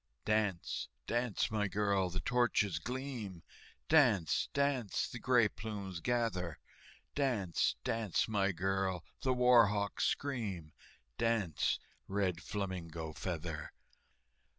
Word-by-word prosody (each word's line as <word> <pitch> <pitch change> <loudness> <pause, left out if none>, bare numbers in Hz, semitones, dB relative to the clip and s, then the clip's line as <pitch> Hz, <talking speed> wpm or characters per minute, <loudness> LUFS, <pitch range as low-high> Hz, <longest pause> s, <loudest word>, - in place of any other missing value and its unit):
"Dance, 105 -5 0 0.2
dance, 120 -3 0
my 105 -2 +1
girl, 100 -2 +1
the 95 +1 -3
torches 110 -4 +2
gleam, 120 -6 -5 0.4
Dance, 120 - +4
dance, 140 -6 +1
the 120 - -7
gray 120 -2 +4
plumes 100 -4 -6
gather, 105 -7 -1 0.6
Dance, 115 - +1
dance, 115 -6 0
my 100 -3 +2
girl, 95 0 -1 0.2
the 130 - +1
war 125 -3 +6
hawks 100 0 0
scream, 100 - -2 0.5
Dance, 110 -9 +1 0.3
Red 95 -4 0
Flamingo 85 -6 -4
Feather!" 80 -3 -4
100 Hz, 105 wpm, -34 LUFS, 90-120 Hz, 0.6 s, war